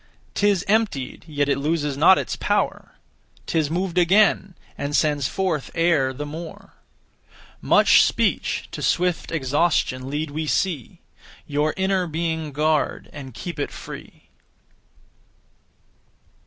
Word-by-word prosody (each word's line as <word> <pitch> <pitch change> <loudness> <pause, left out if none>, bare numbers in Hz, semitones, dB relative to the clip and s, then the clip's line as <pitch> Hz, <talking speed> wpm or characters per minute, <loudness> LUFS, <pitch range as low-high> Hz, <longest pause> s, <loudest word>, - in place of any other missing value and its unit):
'Tis 200 -3 +2
emptied, 200 - 0
yet 145 -2 -1
it 140 - +1
loses 150 -1 -1
not 165 +6 +6
its - - -2
power; - - -1 0.5
'Tis 160 -3 0
moved 180 +1 -1
again, 190 +1 +3 0.2
and 145 +1 -3
sends 145 -4 +2
forth 180 -5 -2
air 165 -6 +2
the 145 +3 -6
more. 160 +2 -9 0.9
Much - - +5
speech - - 0
to - - -6
swift 180 -1 0
exhaustion 140 -3 0
lead 150 +1 -3
we 155 +1 -3
see; 160 -6 -2 0.4
Your 150 +1 0
inner 190 -1 +1
being 160 -1 -2
guard, 155 +2 0
and 130 -4 -9
keep 175 -4 -6
it 145 - -1
free. - - -11
155 Hz, 120 wpm, -23 LUFS, 145-175 Hz, 0.9 s, not